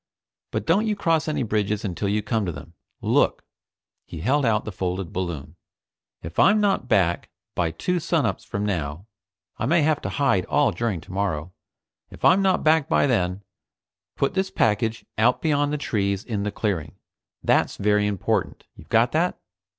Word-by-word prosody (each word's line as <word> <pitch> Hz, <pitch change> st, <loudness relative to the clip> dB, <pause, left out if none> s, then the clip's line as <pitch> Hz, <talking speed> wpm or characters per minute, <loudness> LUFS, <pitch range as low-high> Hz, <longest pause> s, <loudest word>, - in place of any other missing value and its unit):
But -, -, -3 dB
don't 200 Hz, +7 st, +2 dB
you 210 Hz, -, +1 dB
cross 165 Hz, -5 st, +1 dB
any 150 Hz, -3 st, 0 dB
bridges 105 Hz, -1 st, -1 dB
until 100 Hz, +1 st, -2 dB
you 105 Hz, +1 st, 0 dB
come 110 Hz, 0 st, 0 dB
to -, -, -1 dB
them. 85 Hz, -, -10 dB, 0.3 s
Look." -, -, +2 dB, 0.6 s
He 80 Hz, -, -7 dB
held 135 Hz, -, +2 dB
out 110 Hz, -1 st, +1 dB
the 110 Hz, -, -4 dB
folded 90 Hz, -1 st, -3 dB
balloon. 85 Hz, -4 st, -4 dB, 0.7 s
"If 80 Hz, +1 st, -5 dB
I'm 210 Hz, +2 st, +6 dB
not 195 Hz, -11 st, +1 dB
back 85 Hz, -6 st, +1 dB, 0.2 s
by 85 Hz, -2 st, 0 dB
two 180 Hz, -, -2 dB
sunups 150 Hz, -, 0 dB
from 100 Hz, 0 st, -3 dB
now 85 Hz, -3 st, -3 dB, 0.5 s
I -, -, -1 dB
may 170 Hz, -2 st, +3 dB
have 150 Hz, -1 st, +2 dB
to -, -, -3 dB
hide 135 Hz, -11 st, +1 dB
all 145 Hz, -1 st, +2 dB
during 110 Hz, -8 st, -2 dB
tomorrow 90 Hz, -2 st, -3 dB, 0.6 s
if -, -, -6 dB
I'm 195 Hz, -, +6 dB
not 190 Hz, -1 st, +2 dB
back 155 Hz, -2 st, +3 dB
by -, -, +3 dB
then, 95 Hz, -6 st, 0 dB, 0.7 s
put 140 Hz, -, 0 dB
this 190 Hz, 0 st, 0 dB
package 110 Hz, +1 st, 0 dB
out 120 Hz, +3 st, +4 dB
beyond 145 Hz, -2 st, +1 dB
the 150 Hz, -, -1 dB
trees 100 Hz, -7 st, -1 dB
in 110 Hz, -4 st, -2 dB
the 105 Hz, +1 st, -2 dB
clearing. 80 Hz, -10 st, -2 dB, 0.5 s
That's -, -, +2 dB
very 105 Hz, 0 st, +2 dB
important. 100 Hz, -3 st, -1 dB
You've -, -, -15 dB
got -, -, +3 dB
that?" -, -, +1 dB
105 Hz, 175 wpm, -24 LUFS, 90-145 Hz, 0.7 s, I'm